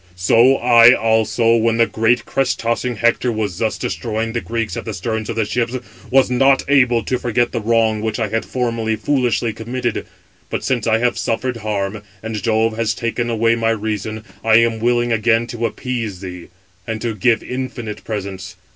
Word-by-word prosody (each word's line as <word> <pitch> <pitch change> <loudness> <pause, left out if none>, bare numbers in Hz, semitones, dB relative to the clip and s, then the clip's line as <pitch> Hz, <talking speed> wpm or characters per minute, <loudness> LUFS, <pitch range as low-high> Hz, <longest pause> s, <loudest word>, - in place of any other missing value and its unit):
"So 115 +8 +4
I 120 -1 +6
also, 115 +1 +2
when 115 0 +1
the 115 - +5
great 115 +2 +1
crest 135 -2 0
tossing 115 +1 -1
Hector 120 +2 +1
was 105 -5 -3
thus 110 -2 0
629 - - -3
destroying 115 -1 -3
the 120 - -1
Greeks 115 -2 -3
at - - -4
the 110 -3 -5
sterns 110 +3 -3
of 115 - -3
the 110 -2 0
ships, 120 +3 -1 0.3
was 130 0 +3
not 135 +2 +3
able 125 -5 +3
to 125 +4 -1
forget 120 0 0
the 115 - -2
wrong 110 -1 +1
which 110 -1 -2
I 110 -2 -1
had 115 +2 -1
formerly 115 -3 -1
foolishly 120 -1 0
committed. 120 +2 -3 0.4
But - - -3
since 120 -4 -1
I 110 0 +3
have 120 +1 0
suffered 120 +2 -2
harm, 105 -1 -3 0.2
and 110 -2 -4
Jove 110 -1 +1
has 110 -2 0
taken 120 +1 -2
away 115 0 +2
my 115 -1 0
reason, 110 0 -3 0.2
I 110 -1 +4
am 115 0 +3
willing 120 +1 +1
again 115 +1 +2
to 115 0 -2
appease 115 -8 -4
thee, 90 -2 -8 0.4
and 110 -1 -3
to 115 -2 -1
give 110 +3 +1
infinite 125 -4 -5
presents. 95 -3 -6
115 Hz, 190 wpm, -19 LUFS, 110-120 Hz, 0.4 s, I